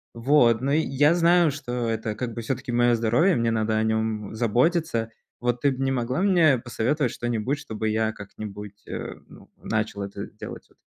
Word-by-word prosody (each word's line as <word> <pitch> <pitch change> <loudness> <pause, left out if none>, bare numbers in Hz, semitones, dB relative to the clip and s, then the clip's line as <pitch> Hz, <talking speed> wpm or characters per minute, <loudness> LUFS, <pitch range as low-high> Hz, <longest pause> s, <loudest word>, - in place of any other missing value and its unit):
Вот, 120 -2 +4
но 135 +2 0
я 150 0 +3
знаю, 170 -1 +4
что 125 -4 -3
это 110 -1 -2
как 120 +1 -4
бы 115 - -5
всё-таки 125 +2 -3
моё 120 0 +3
здоровье, 120 - +3
мне 115 -1 +1
надо 110 -1 0
о 110 - +2
нём 110 -1 -1
заботиться. 120 +1 +1 0.3
Вот, 120 0 -1
ты 140 - +4
бы 130 0 -3
не 135 - +1
могла 125 +4 -1
мне 170 -8 +4
посоветовать 120 +3 -1
что-нибудь, 120 +4 -2
чтобы 110 -6 -3
я 110 0 +1
как-нибудь, 105 0 -9
э, - - -5
ну, - - -16
начал 110 -2 -2
это 100 +1 -5
делать 110 - -10
вот. - - -26
120 Hz, 180 wpm, -25 LUFS, 110-135 Hz, 0.3 s, Вот